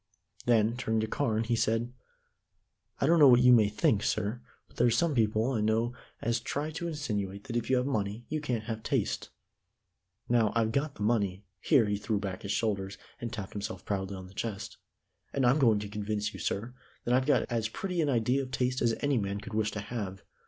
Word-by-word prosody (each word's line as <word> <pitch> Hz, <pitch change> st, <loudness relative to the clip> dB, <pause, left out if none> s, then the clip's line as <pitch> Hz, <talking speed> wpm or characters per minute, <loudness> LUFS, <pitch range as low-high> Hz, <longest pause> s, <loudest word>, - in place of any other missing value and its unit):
Then, 115 Hz, -1 st, +4 dB
turning 110 Hz, -3 st, 0 dB
to 110 Hz, -, -1 dB
Carne, 110 Hz, -2 st, 0 dB
he 115 Hz, +1 st, 0 dB
said: 115 Hz, +2 st, 0 dB, 1.1 s
"I -, -, +2 dB
don't 165 Hz, +3 st, +5 dB
know 145 Hz, -, +9 dB
what 125 Hz, -1 st, +7 dB
you 125 Hz, 0 st, +8 dB
may 110 Hz, -4 st, +5 dB
think, 105 Hz, 0 st, +2 dB
sir, 110 Hz, +4 st, -1 dB, 0.3 s
but -, -, -23 dB
there 120 Hz, -, +4 dB
are -, -, +5 dB
some 155 Hz, +7 st, +2 dB
people 110 Hz, 0 st, +2 dB
I 115 Hz, -5 st, 0 dB
know 110 Hz, +3 st, +1 dB, 0.3 s
as 115 Hz, 0 st, +1 dB
try 145 Hz, +6 st, -3 dB
to 170 Hz, +2 st, -4 dB
insinuate 105 Hz, -, -3 dB
that 120 Hz, -, -6 dB
if 120 Hz, -1 st, -1 dB
you 130 Hz, -, +4 dB
have 125 Hz, -, +1 dB
money 110 Hz, -3 st, -2 dB
you 155 Hz, 0 st, -2 dB
can't 125 Hz, -6 st, -2 dB
have 110 Hz, 0 st, -4 dB
taste. -, -, -1 dB, 1.0 s
Now, 115 Hz, -3 st, +3 dB
I've 115 Hz, -1 st, +2 dB
got 140 Hz, +3 st, -1 dB
the 105 Hz, -, -5 dB
money" 100 Hz, -4 st, +1 dB, 0.2 s
here 115 Hz, +5 st, +4 dB
he 105 Hz, 0 st, 0 dB
threw 105 Hz, +1 st, -1 dB
back 100 Hz, -2 st, -4 dB
his 100 Hz, -, -4 dB
shoulders, 100 Hz, -3 st, -1 dB, 0.2 s
and 115 Hz, -1 st, -4 dB
tapped 105 Hz, -4 st, -6 dB
himself 100 Hz, -1 st, -5 dB
proudly 95 Hz, -1 st, -2 dB
on 95 Hz, -, -8 dB
the 90 Hz, -, -14 dB
chest 100 Hz, 0 st, -5 dB, 0.6 s
"and 135 Hz, -2 st, +1 dB
I'm 125 Hz, +5 st, +4 dB
going 115 Hz, -6 st, +5 dB
to 105 Hz, 0 st, -4 dB
convince 105 Hz, 0 st, -3 dB
you, -, -, -8 dB
sir, 115 Hz, +5 st, -2 dB, 0.3 s
that 120 Hz, -, +1 dB
I've 130 Hz, +2 st, +3 dB
got 145 Hz, -3 st, +3 dB
as 115 Hz, -2 st, 0 dB
pretty 180 Hz, +6 st, -2 dB
an 150 Hz, -, +1 dB
idea 125 Hz, +2 st, +2 dB
of 130 Hz, -, -6 dB
taste 130 Hz, 0 st, -1 dB
as 115 Hz, -1 st, +2 dB
any 140 Hz, -4 st, +2 dB
man 100 Hz, 0 st, -2 dB
could 105 Hz, +1 st, -9 dB
wish 110 Hz, 0 st, +1 dB
to 105 Hz, -1 st, -5 dB
have. 100 Hz, -4 st, -5 dB
115 Hz, 220 wpm, -30 LUFS, 105-125 Hz, 1.1 s, know